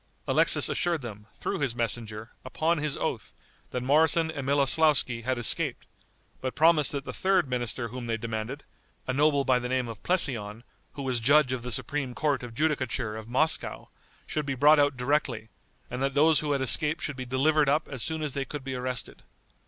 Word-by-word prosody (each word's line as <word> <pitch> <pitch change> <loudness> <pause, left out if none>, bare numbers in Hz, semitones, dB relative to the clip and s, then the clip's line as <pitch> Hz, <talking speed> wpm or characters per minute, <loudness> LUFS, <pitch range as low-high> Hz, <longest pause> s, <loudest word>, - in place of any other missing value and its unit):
Alexis - - +5
assured 170 -5 -1
them, 105 -2 -9
through - - -3
his 135 -5 -1
messenger, 115 -2 -4
upon 160 +5 -1
his 150 -1 -2
oath, - - -4 0.3
that 125 - -4
Moroson 160 +4 +3
and 140 -4 -6
Miloslauski 140 -3 +2
had 130 +2 -2
escaped, 120 - +1 0.6
but 130 -1 -4
promised 155 +1 +4
that 140 -1 -4
the - - -6
third 190 -5 +1
minister 120 -1 -3
whom 125 +1 -7
they 115 -1 -1
demanded, 115 +4 -5 0.4
a 130 - -2
noble 145 0 +2
by 125 -1 +3
the 125 0 -5
name 130 -1 0
of 115 -2 -9
Plesseon, 120 - 0 0.3
who 140 - -6
was 130 -2 0
judge 140 +3 +4
of 130 -2 -2
the 125 +1 -6
supreme 135 +1 -2
court 145 -4 0
of 120 -2 -9
judicature 130 -6 -1
of 110 0 -8
Moscow, 145 +7 0 0.4
should 150 -2 -3
be 135 - -1
brought 150 +3 +5
out 145 -2 +2
directly, 125 -4 -1 0.4
and 125 +1 -6
that 135 +1 -1
those 155 +2 +4
who 150 -1 -1
had 140 - -1
escaped 150 +5 +1
should 145 - -3
be 130 - -5
delivered 140 +4 +2
up 150 +3 +1
as 135 -4 -6
soon 160 +3 -3
as 150 -3 -2
they 140 - -2
could 145 +1 -7
be 135 0 -5
arrested. 125 0 -4
135 Hz, 195 wpm, -27 LUFS, 120-150 Hz, 0.6 s, Alexis